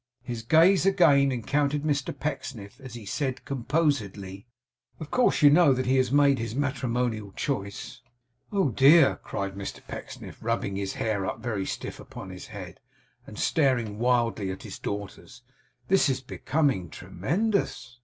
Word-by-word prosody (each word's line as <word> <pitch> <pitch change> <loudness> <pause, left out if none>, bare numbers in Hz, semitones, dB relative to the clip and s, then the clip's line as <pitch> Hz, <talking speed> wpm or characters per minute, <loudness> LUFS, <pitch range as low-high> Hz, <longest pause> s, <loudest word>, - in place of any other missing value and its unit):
His 120 -2 -5
gaze 165 - +5
again 145 -8 +5
encountered 145 +4 0
Mr 145 -2 -1
Pecksniff, 125 -6 -5
as 130 -3 -9
he 115 -3 -9
said, 130 +4 -3
composedly: 120 - -2 0.5
'Of 155 - -8
course 250 -10 +2
you 145 - +9
know 155 -2 +6
that 130 0 -1
he 130 +2 +2
has 130 -1 +2
made 140 -1 +4
his 115 0 -4
matrimonial 125 -6 -1
choice?' 125 0 -4 0.5
'Oh 195 -7 +2
dear!' 140 +6 +6
cried 100 -1 -4
Mr 100 0 -7
Pecksniff, - - -9
rubbing 115 -4 -1
his 100 -1 -3
hair 110 -3 -1
up 115 - -4
very 105 -5 -2
stiff - - -5
upon 95 - -9
his 90 - -9
head, 95 -6 -9 0.5
and 105 - -10
staring 125 -9 +1
wildly 115 -4 +1
at 95 - -6
his - - -8
daughters. 100 +2 -7 0.4
'This 190 -5 +4
is 130 -1 -1
becoming 130 - -1
tremendous! 165 - -2
125 Hz, 150 wpm, -27 LUFS, 105-145 Hz, 0.5 s, you